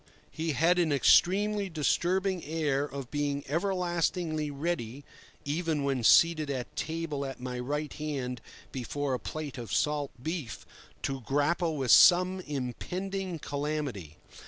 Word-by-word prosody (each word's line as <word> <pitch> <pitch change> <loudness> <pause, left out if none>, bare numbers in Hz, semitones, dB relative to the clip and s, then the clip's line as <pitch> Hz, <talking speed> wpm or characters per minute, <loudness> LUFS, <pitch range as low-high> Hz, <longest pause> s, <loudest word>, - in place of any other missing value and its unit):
He 160 -1 -2
had 170 +6 +3
an 165 -3 +2
extremely 200 +8 +4
disturbing 180 +3 0
air 145 -3 0
of 140 -3 -7
being 145 -1 -1
everlastingly 175 -2 -1
ready 140 -3 -3 0.4
(even 155 0 -1
when 135 -3 0
seated 155 +4 +5
at 130 -3 -4
table 160 -3 -3
at 135 -1 -6
my 125 0 -5
right 145 +4 -3
hand 135 -6 -4 0.3
before 135 +2 -3
a 125 - -1
plate 150 -4 -6
of 115 - -7
salt 150 -2 +1
beef) 155 -3 -5 0.4
to 135 -1 -2
grapple 150 +6 0
with 130 -4 +1
some 185 +5 +7
impending 180 +6 -4
calamity. 145 - -4
150 Hz, 130 wpm, -29 LUFS, 135-170 Hz, 0.4 s, some